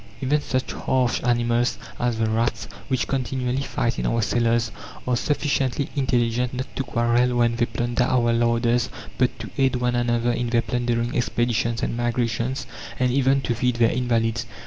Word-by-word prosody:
Even 145 +2 +1
such 130 -2 -2
harsh 130 -2 0
animals 120 0 +1 0.2
as 120 -2 0
the 110 0 +1
rats, 115 +2 0 0.2
which 130 -2 0
continually 130 -1 -1
fight 120 -3 -1
in - - -1
our 115 -1 +1
cellars, 115 -1 +1 0.4
are 125 - +2
sufficiently 140 0 0
intelligent 125 -2 +1
not 130 +1 -2
to 135 - -1
quarrel 120 0 +1
when 120 -1 +3
they 120 0 +1
plunder 120 0 0
our 120 -2 +2
larders, 115 0 +2 0.3
but - - +2
to - - -8
aid 135 -1 +3
one 125 0 0
another 120 0 +1
in 120 0 -1
their 115 0 +2
plundering 120 0 -1
expeditions 120 -1 0
and - - -1
migrations, 120 +1 -1 0.3
and 125 -1 +2
even 135 +1 +3
to 120 - -1
feed 125 +1 0
their 115 -1 +3
invalids. 115 -1 0
120 Hz, 170 wpm, -23 LUFS, 115-125 Hz, 0.4 s, when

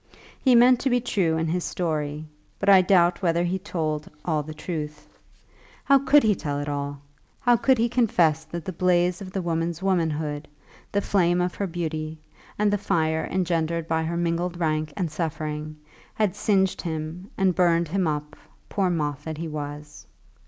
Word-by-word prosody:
He 255 -3 +5
meant 245 +1 +6
to 270 - 0
be 245 0 +3
true 185 -9 0
in 160 - 0
his 175 +2 -1
story, 155 -3 -2 0.3
but 200 - 0
I 195 -2 +8
doubt 180 -1 +3
whether 170 -2 +2
he 180 +2 -1
told 155 -6 -3 0.2
all 155 -3 +1
the 150 +2 -8
truth. 150 -2 -6 0.6
How 275 0 +5
could 280 +2 +5
he 215 -1 +4
tell 145 -6 -3
it 145 - -4
all? 140 -1 -4 0.4
How 245 -1 +4
could 240 +3 +3
he 230 +1 +2
confess 180 -10 +2
that 170 +1 -7
the 185 - -4
blaze 180 +1 +2
of 185 -1 -7
the 190 -1 -3
woman's 165 +1 -2
womanhood, 155 -5 -1 0.4
the 200 - +1
flame 180 -3 +2
of 180 0 0
her 200 - -2
beauty, 160 -2 -4 0.4
and 210 0 +2
the 205 - +1
fire 160 -3 0
engendered 170 -3 -1
by 160 0 +1
her 170 +1 -2
mingled 175 +1 -1
rank 155 -2 0
and 175 -5 -1
suffering, 155 -1 -4 0.4
had 210 -4 +1
singed 190 -3 +1
him 165 +3 -5
and 190 -2 +3
burned 170 -1 +3
him 185 0 0
up, 150 -1 -3 0.3
poor 195 -2 +1
moth 145 -4 -2
that 160 -1 -4
he 165 +1 -4
was? 150 -1 -7
170 Hz, 180 wpm, -25 LUFS, 155-190 Hz, 0.6 s, I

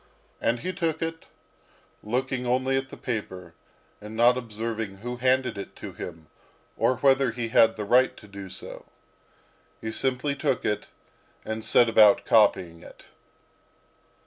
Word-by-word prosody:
And 115 +1 0
he 185 - -3
took 165 -3 -1
it, 165 0 -5 0.7
looking 125 +3 -2
only 130 +2 +1
at 135 0 -2
the - - -10
paper, 95 -8 -5 0.5
and 105 +1 -9
not 120 +2 +5
observing 110 -3 -4
who 120 +4 -6
handed 130 -3 +1
it 100 - -8
to - - -8
him, 80 -2 -8 0.5
or 130 - +1
whether 135 -1 +3
he 115 0 -4
had 115 0 +5
the 105 - -5
right 125 +5 +3
to 105 - -14
do 100 -1 -9
so; 95 - -10 1.0
simply 130 +4 0
took 140 -2 -1
it, 105 - -1 0.6
and 110 0 -4
set 120 +1 +4
about 110 -2 +5
copying 90 -6 +3
it. - - -14
120 Hz, 145 wpm, -26 LUFS, 105-130 Hz, 1.0 s, not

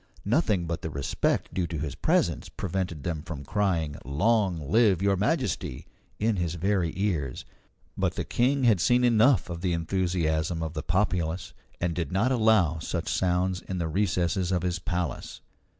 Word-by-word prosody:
Nothing 105 - +2
but 85 0 -3
the 80 - -4
respect 70 -2 -1
due 90 -2 -1
to 80 - -4
his 75 -1 -3
presence - - 0
prevented 90 -5 -3
them 80 -3 -2
from 75 -4 -7
crying 85 -5 0
"Long 90 - +1
live 110 -6 +4
Your 100 0 +2
Majesty!" 95 -9 -1 0.3
in 110 -1 +1
his 85 -2 -1
very 90 -1 0
ears. 85 -10 -2 0.5
But - - 0
the - - -2
King 130 +3 +1
had 110 -6 +4
seen 125 +5 +3
enough 120 +2 +4
of 85 -1 -6
the 90 -2 0
enthusiasm 85 -2 0
of 80 -1 -4
the 80 - -3
populace, 90 -1 -1 0.3
and 85 -1 0
did 85 +1 -3
not 105 +8 +2
allow 110 - +3
such 85 +1 -3
sounds 90 0 +1
in 95 - -5
the 85 -2 -1
recesses 90 0 0
of 90 -2 0
his 90 0 -1
palace. 85 -3 -3
90 Hz, 165 wpm, -27 LUFS, 80-100 Hz, 0.5 s, live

